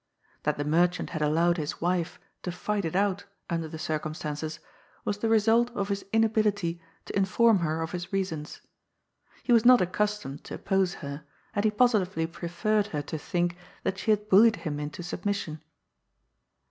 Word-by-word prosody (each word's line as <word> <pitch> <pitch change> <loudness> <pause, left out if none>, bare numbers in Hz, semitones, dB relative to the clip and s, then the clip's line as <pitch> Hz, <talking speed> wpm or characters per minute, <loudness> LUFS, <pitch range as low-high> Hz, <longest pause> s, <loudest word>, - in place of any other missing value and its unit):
That - - 0
the 145 - -2
merchant 175 +4 +2
had 155 - -3
allowed 165 +4 +3
his 150 -1 -3
wife 175 0 -1 0.2
to 180 - -3
fight 200 +2 -2
it 165 - -3
out) 200 0 +1 0.3
under 165 -1 -1
the 160 - -7
circumstances, 155 0 -3 0.5
was 205 0 -1
the 225 - 0
result 225 +2 +4
of 200 0 -2
his 200 0 -2
in 225 0 +4
ability 205 -6 +1 0.2
to - - -7
inform 210 +2 +4
her 160 -1 -1
of 160 - -5
his 175 -1 -5
reasons. 185 -6 -3 0.8
He 245 - +3
was 230 -2 +6
not 250 0 +8
accus 210 +3 0
tomed 140 -4 -8
to - - -6
oppose 190 -2 0
her, 140 +2 -6 0.3
and 205 - 0
he - - +5
positively 210 -7 +2
preferred 180 +5 -1
her 150 -6 -3
to 155 +2 -5
think 175 +1 -1 0.3
that 190 - -1
she - - -3
had 210 -1 +2
bullied 220 +3 +6
him 150 -6 -4
into 150 +3 -5
submission. 175 -4 -3
180 Hz, 175 wpm, -28 LUFS, 160-210 Hz, 0.8 s, not